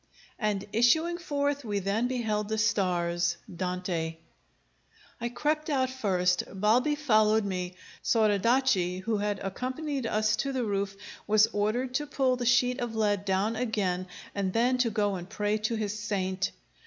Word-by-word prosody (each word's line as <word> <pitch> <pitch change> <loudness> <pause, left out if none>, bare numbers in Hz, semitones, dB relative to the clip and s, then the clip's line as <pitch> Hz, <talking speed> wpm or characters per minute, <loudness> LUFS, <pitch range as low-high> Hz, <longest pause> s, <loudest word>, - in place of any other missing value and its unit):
"And 210 -3 -1
issuing 315 +10 +3
forth 285 -3 -1
we 210 -3 -2
then 200 +5 0
beheld 215 -4 -1
the 220 - -1
stars." 175 -5 +1 0.2
DANTE. 180 -3 -2 1.0
I 235 - -1
crept 305 +5 -1
out 260 -3 +1
first; 185 -7 +1
Balbi 220 +9 +2
followed 220 -7 +3
me. 180 -2 -3 0.3
Soradaci, 215 -3 +2
who 220 +2 0
had 205 0 -1
accompanied 260 +6 -3
us 215 0 +2
to 275 +2 -1
the 260 -2 -1
roof, 200 -2 -1 0.3
was 215 0 +6
ordered 225 +5 0
to 295 +3 -1
pull 265 -3 +1
the 245 -1 -2
sheet 250 +1 +3
of 240 -2 -3
lead 205 -2 +1
down 200 +3 +1
again 195 -6 -1 0.3
and 195 -2 -1
then 250 +2 +2
to 245 -2 +3
go 205 -2 0
and 180 -1 -6
pray 210 0 0
to 220 +2 -1
his 215 -1 -3
saint. 190 -3 -1
215 Hz, 155 wpm, -28 LUFS, 195-250 Hz, 1.0 s, was